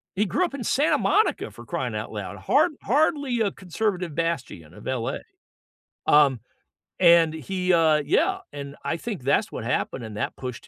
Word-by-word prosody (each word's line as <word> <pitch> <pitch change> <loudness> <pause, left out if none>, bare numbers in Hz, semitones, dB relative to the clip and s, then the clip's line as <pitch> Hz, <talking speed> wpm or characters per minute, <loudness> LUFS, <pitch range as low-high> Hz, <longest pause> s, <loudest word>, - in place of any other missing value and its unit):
He 205 +3 +2
grew 365 - +1
up 345 - -6
in 280 -3 -5
Santa 290 +7 +2
Monica 435 - +1
for - - -12
crying - - -3
out - - -4
loud. - - -6
Hard 340 - +2
hardly 285 -2 +1
a 205 -3 +1
conservative 185 -3 -3
bastion 140 - -3
of - - -13
LA. 125 -3 -2 0.9
Um, 140 -4 +5 0.6
and 170 -3 +6
he, 180 +4 -1
uh 160 -2 +4
yeah, 145 - +2
and 140 -1 -7
I 165 - -1
think 205 - -6
that's 175 - +1
what - - -5
happened, 125 +1 -2
and 110 -2 -8
that - - -3
pushed 125 -2 -7
170 Hz, 175 wpm, -25 LUFS, 140-215 Hz, 0.9 s, and